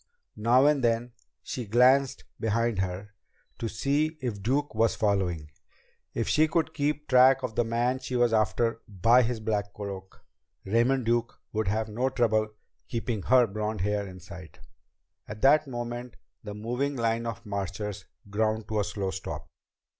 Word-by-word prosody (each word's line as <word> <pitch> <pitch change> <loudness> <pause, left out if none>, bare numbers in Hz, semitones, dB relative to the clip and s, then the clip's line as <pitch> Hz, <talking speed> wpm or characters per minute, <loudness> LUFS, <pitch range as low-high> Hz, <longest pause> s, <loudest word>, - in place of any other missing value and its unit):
Now 120 +5 +4
and 145 -3 +3
then 120 +1 +1 0.3
she 125 -4 -5
glanced 130 +5 +4 0.2
behind 115 -1 0
her 95 +2 -3 0.5
to 115 - -2
see 150 +7 0
if 115 -6 -4
Duke 140 +7 0
was 110 +1 +2
following. 90 -7 0 0.6
If - - -1
she 155 +1 +4
could 160 0 0
keep 150 -1 -1
track 130 +1 +6
of 125 -3 -3
the 120 - +2
man 120 +3 0
she 130 -1 -5
was 120 -2 +3
after 115 +2 +1
by 115 +5 +4
his 120 -1 -1
black 105 -2 -2
cloak, 95 -2 -8 0.4
Raymond 120 +5 +2
Duke 120 0 0
would 110 -1 -1
have 110 +3 0
no 120 +5 -1
trouble 110 -4 +2 0.4
keeping 115 -2 -3
her 125 +4 +5
blond 105 -1 -3
hair 105 +1 -1
in 95 0 -10
sight! 90 -1 -11 0.7
At 105 0 -9
that 145 +2 +5
moment 120 -1 -5 0.3
the 105 -1 -7
moving 125 +7 -2
line 115 -1 0
of 115 - -6
marchers 100 0 -4 0.2
ground 110 +1 -1
to 110 -1 0
a - - +2
slow 100 -2 -3
stop. 75 -6 -6
115 Hz, 160 wpm, -28 LUFS, 105-125 Hz, 0.7 s, track